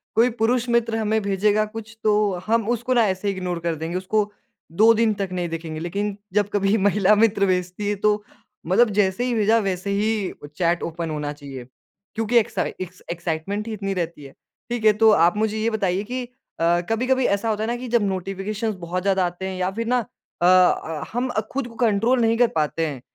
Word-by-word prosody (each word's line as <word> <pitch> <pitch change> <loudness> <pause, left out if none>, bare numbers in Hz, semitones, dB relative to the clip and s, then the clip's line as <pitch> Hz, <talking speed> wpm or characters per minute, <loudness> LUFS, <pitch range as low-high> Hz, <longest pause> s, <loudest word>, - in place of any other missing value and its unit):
कोई 230 +3 +5
पुरुष 240 +2 +2
मित्र 235 -1 +1
हमें 220 0 +1
भेजेगा 205 +1 +2
कुछ 220 +1 -9
तो 210 -2 +2
हम 225 -1 +1
उसको 240 +2 0
ना 235 -2 +4
ऐसे 190 +1 -2
ही 200 - +1
इग्नोर 180 -2 -3
कर 170 -1 -2
देंगे 165 +3 -4
उसको 205 +3 0 0.5
2 230 +1 +8
दिन 225 -1 +2
तक 195 -2 -3
नहीं 175 -2 -2
देखेंगे 160 -1 -5
लेकिन 200 +5 -3 0.2
जब 205 0 +2
कभी 200 0 +2
महिला 205 0 +3
मित्र 210 -2 +3
भेजती 180 +2 -1
है 205 - 0
तो 210 +1 +1 0.4
मतलब 220 +7 +4
जैसे 190 +4 +2
ही 250 - 0
भेजा 220 +1 +3
वैसे 195 -2 -2
ही 210 0 0 0.2
चैट 175 -1 +1
ओपन 165 0 -4
होना 150 -1 -3
चाहिए। 140 -4 -9 0.5
क्योंकि 225 +2 +1
एक्स 225 - +1 0.5
एक्साइटमेंट 170 +5 -3
ही 225 - -4
इतनी 195 -2 -3
रहती 170 -4 -4
है, 135 - -11 0.4
ठीक 235 -2 -2
है? 215 - +7
तो 220 +1 +5
आप 175 0 +4
मुझे 220 0 0
ये 220 +1 +1
बताइए 195 -3 0
की 250 +4 -4
अ, 175 -9 -1
कभी-कभी 255 +3 +1
ऐसा 200 +3 +1
होता 215 0 -1
है - - -1
ना 240 - -1
कि 250 +1 -7
जब 235 -2 +2
नोटिफ़िकेशंस 195 +3 -3
बहुत 180 +1 -3
ज़्यादा 190 -2 +2
आते 175 +2 -5
हैं 190 -1 -5
या 180 0 +1
फिर 230 +4 -4
ना 250 0 +2 0.4
अ - - +3
अ, 180 -3 +3
हम 245 +2 -1 0.2
खुद 270 -2 -2
को 230 - -13
कंट्रोल 230 +2 +2
नहीं 225 0 +2
कर 245 - +5
पाते 160 +1 0
हैं 140 -4 -6
205 Hz, 205 wpm, -23 LUFS, 180-225 Hz, 0.5 s, 2